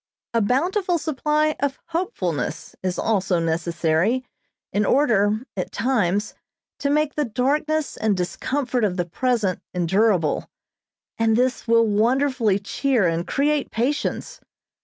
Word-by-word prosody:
A 230 Hz, -, +2 dB
bountiful 345 Hz, -, +1 dB
supply 305 Hz, 0 st, 0 dB
of 280 Hz, -1 st, -1 dB
hopefulness 175 Hz, -, -3 dB
is 185 Hz, -1 st, -2 dB
also 190 Hz, -4 st, +1 dB
necessary, 170 Hz, +7 st, 0 dB, 0.5 s
in 205 Hz, -, +2 dB
order, 215 Hz, -3 st, +2 dB
at 185 Hz, -, -3 dB
times, 205 Hz, -4 st, 0 dB, 0.5 s
to 280 Hz, -, 0 dB
make 300 Hz, 0 st, +1 dB
the 300 Hz, -, 0 dB
darkness 290 Hz, +6 st, 0 dB
and 215 Hz, -3 st, +1 dB
discomfort 250 Hz, +7 st, -1 dB
of 195 Hz, -3 st, 0 dB
the 175 Hz, -, 0 dB
present 215 Hz, 0 st, 0 dB
endurable, 180 Hz, -1 st, +1 dB, 0.7 s
and 225 Hz, -1 st, +3 dB
this 255 Hz, +1 st, 0 dB
will 230 Hz, 0 st, +5 dB
wonderfully 230 Hz, 0 st, +2 dB
cheer 220 Hz, +1 st, +1 dB
and 165 Hz, +1 st, -1 dB
create 290 Hz, 0 st, +1 dB
patience. 270 Hz, +6 st, -2 dB
230 Hz, 120 wpm, -23 LUFS, 190-280 Hz, 0.7 s, will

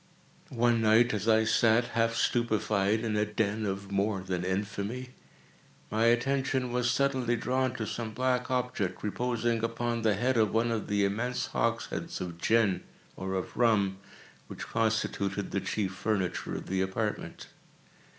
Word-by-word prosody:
One 120 Hz, -1 st, +3 dB
night 110 Hz, +2 st, +5 dB
as 105 Hz, 0 st, -2 dB
I 110 Hz, 0 st, +5 dB
sat, 115 Hz, +2 st, +3 dB
half 115 Hz, 0 st, +1 dB
stupefied, 110 Hz, -3 st, +1 dB
in 110 Hz, -2 st, -1 dB
a 105 Hz, -, +2 dB
den 105 Hz, 0 st, -1 dB
of 100 Hz, 0 st, -4 dB
more 100 Hz, 0 st, 0 dB
than 90 Hz, -1 st, -3 dB
infamy, 100 Hz, +6 st, -3 dB, 0.8 s
my 110 Hz, +2 st, +2 dB
attention 130 Hz, +1 st, +1 dB
was 125 Hz, 0 st, +1 dB
suddenly 130 Hz, -2 st, +1 dB
drawn 130 Hz, +2 st, 0 dB
to 110 Hz, -, -3 dB
some 115 Hz, 0 st, -4 dB
black 125 Hz, +1 st, 0 dB
object, 125 Hz, -7 st, -1 dB
reposing 115 Hz, +1 st, -1 dB
upon 115 Hz, 0 st, -1 dB
the 110 Hz, -2 st, +2 dB
head 125 Hz, +4 st, +1 dB
of 110 Hz, -1 st, +2 dB
one 115 Hz, +1 st, +2 dB
of 115 Hz, -2 st, -2 dB
the 100 Hz, -1 st, +2 dB
immense 120 Hz, +6 st, -1 dB
hogsheads -, -, -1 dB
of 85 Hz, -2 st, -6 dB
gin, 110 Hz, -2 st, +2 dB, 0.3 s
or 95 Hz, 0 st, -3 dB
of 95 Hz, -, -4 dB
rum, 100 Hz, -5 st, +2 dB, 0.5 s
which -, -, -7 dB
constituted 105 Hz, -3 st, -1 dB
the 100 Hz, -, -1 dB
chief 95 Hz, 0 st, -2 dB
furniture 95 Hz, -2 st, -2 dB
of -, -, -5 dB
the 95 Hz, 0 st, -1 dB
apartment. 105 Hz, +3 st, -3 dB
110 Hz, 150 wpm, -29 LUFS, 100-120 Hz, 0.8 s, night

